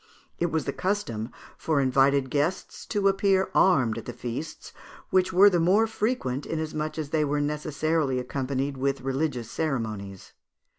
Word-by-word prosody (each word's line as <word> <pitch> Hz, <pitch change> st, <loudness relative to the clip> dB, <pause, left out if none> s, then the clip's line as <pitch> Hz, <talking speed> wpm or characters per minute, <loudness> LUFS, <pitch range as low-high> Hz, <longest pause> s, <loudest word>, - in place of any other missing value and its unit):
It 175 Hz, -, +2 dB
was 160 Hz, 0 st, -1 dB
the 140 Hz, -, -2 dB
custom 155 Hz, -, -2 dB, 0.3 s
for 155 Hz, -3 st, +1 dB
invited 135 Hz, 0 st, +3 dB
guests 150 Hz, +6 st, -2 dB
to 205 Hz, -1 st, +1 dB
appear 195 Hz, -1 st, +2 dB
armed 130 Hz, -12 st, +3 dB
at -, -, -11 dB
the 120 Hz, -, -6 dB
feasts, 120 Hz, +6 st, -6 dB, 0.4 s
which 185 Hz, 0 st, +3 dB
were 190 Hz, +3 st, +7 dB
the 180 Hz, -4 st, +4 dB
more 190 Hz, +7 st, +4 dB
frequent, 215 Hz, -, -2 dB
inasmuch 155 Hz, -1 st, -3 dB
as 150 Hz, -2 st, -4 dB
they 155 Hz, -1 st, +2 dB
were 145 Hz, 0 st, 0 dB
necessarily 150 Hz, -1 st, 0 dB
accompanied 135 Hz, +2 st, -2 dB
with 135 Hz, 0 st, -1 dB
religious 135 Hz, -3 st, -2 dB
ceremonies. 110 Hz, -, -4 dB
150 Hz, 150 wpm, -26 LUFS, 130-170 Hz, 0.4 s, were